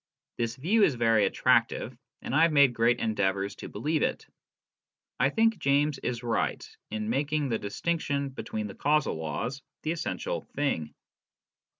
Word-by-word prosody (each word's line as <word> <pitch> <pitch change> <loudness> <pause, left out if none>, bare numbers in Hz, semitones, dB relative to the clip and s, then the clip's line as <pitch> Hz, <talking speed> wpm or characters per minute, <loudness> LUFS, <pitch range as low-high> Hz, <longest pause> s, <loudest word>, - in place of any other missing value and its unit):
This 115 0 -1
view 180 +12 +2
is 170 -10 +4
very 115 -3 +3
attractive, - - +1 0.3
and - - -4
I 155 - +4
have 165 0 +5
made 140 -4 +5
great 115 +1 +3
endeavours 100 -2 0
to - - -8
believe 150 +8 -1
it. - - -1 0.9
I 130 - +4
think 225 +8 +2
James 140 +1 +2
is 120 -1 -3
right 115 -2 -1 0.2
in 110 0 -3
making 145 +2 0
the 115 - 0
distinction 140 +5 -2
between 110 -5 -5
the 100 - -6
causal 150 +5 +1
laws 80 - -4 0.2
the 155 - 0
essential 485 - -3
thing. 80 - -1
135 Hz, 155 wpm, -28 LUFS, 110-150 Hz, 0.9 s, have